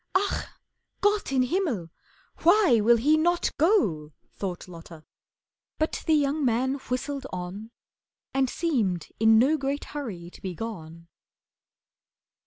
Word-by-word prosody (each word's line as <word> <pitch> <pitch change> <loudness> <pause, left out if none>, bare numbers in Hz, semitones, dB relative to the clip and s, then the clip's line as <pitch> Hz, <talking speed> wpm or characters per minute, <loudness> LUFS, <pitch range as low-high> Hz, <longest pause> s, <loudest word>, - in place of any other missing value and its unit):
"Ach, 395 +2 0 0.5
Gott 410 -6 +1
im 260 -1 +3
Himmel! 250 - -1 0.5
Why 345 - +5
will 235 +3 +5
he 295 +7 +3
not 345 +2 +1
go!" 195 - +2 0.2
Thought 185 -3 -5
Lotta, 165 -2 -12 0.7
but 315 - -2
the 320 - +5
young 295 +1 +1
man 255 +2 +1 0.2
whistled 270 +2 -3
on, 185 +4 -6 0.6
And 265 -1 +1
seemed 220 - -1
in 220 0 +6
no 275 +7 +4
great 280 0 -2
hurry 195 -13 -6
to - - -15
be 185 -2 -5
gone. 165 -6 -7
250 Hz, 125 wpm, -26 LUFS, 185-305 Hz, 0.7 s, in